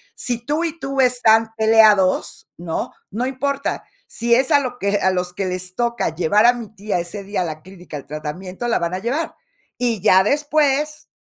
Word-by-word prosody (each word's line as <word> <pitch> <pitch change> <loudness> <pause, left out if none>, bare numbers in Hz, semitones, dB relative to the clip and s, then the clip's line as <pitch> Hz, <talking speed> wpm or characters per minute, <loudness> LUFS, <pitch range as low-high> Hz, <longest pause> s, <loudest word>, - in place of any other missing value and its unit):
Si 240 -2 -3
tú 300 +5 0
y 330 -1 -4
tú 275 -3 -4
están 225 -3 +4
peleados, 220 -4 +3
¿no?, 170 -1 -4 0.2
no 230 +6 -2
importa. 275 +2 -2 0.2
Si 235 0 0
es 260 +2 +1
a - - +6
lo 250 -3 -5
que 200 -1 +1
a 190 -1 +2
los 180 -1 -2
que 195 +1 -3
les 185 0 -5
toca 235 -8 -1
llevar 180 +6 +3
a 245 - +6
mi 230 -3 -8
tía 200 -3 -2
ese 185 +4 -6
día 200 0 -3
a - - -3
la 155 -2 -6
clínica 180 -3 -12
al 140 - -8
tratamiento, 180 - -6
la 235 - +1
van 170 +1 -2
a 185 - -3
llevar, 260 +10 -2 0.4
y 235 -5 -1
ya 190 -2 +5
después, 295 +2 +1
220 Hz, 200 wpm, -20 LUFS, 185-255 Hz, 0.4 s, a